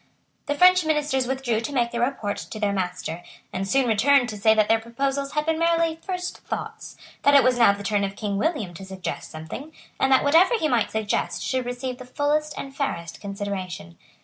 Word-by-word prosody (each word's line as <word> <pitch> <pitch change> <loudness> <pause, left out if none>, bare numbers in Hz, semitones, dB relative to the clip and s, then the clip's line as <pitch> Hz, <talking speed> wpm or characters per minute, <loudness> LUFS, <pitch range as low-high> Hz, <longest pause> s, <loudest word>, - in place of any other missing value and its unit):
The 290 - 0
French 365 +2 +6
Ministers 295 -4 0
withdrew 255 -4 -1
to 260 - -4
make 240 -4 +1
their 235 - -2
report 240 -5 -1
to 215 - -7
their 205 -1 +1
master, 180 -3 -3 0.3
and 190 +1 -2
soon 265 +6 +2
returned 245 +4 +4
to 215 - -6
say 220 +2 +4
that 215 -1 +3
their 225 - +3
proposals 275 +4 -2
had 300 0 0
been 320 0 0
merely 335 -1 +2
first 360 -1 -4
thoughts, - - -6 0.2
that 285 - +5
it 280 - +7
was 250 -1 +2
now 230 -4 +7
the 200 0 -8
turn 205 0 +1
of 195 0 -3
King 205 -2 -3
William 270 - -1
to 175 - -10
suggest 190 -1 -6
something, 160 - -8 0.3
and 270 - +2
that 260 - +5
whatever 330 +11 +5
he 315 - 0
might 240 -6 +1
suggest 220 -1 -2
should 255 -2 -1
receive 250 +1 -4
the 255 - -9
fullest 295 +4 -1
and 275 0 -7
fairest 170 - -4
consideration. 195 - -5
245 Hz, 205 wpm, -24 LUFS, 205-285 Hz, 0.3 s, it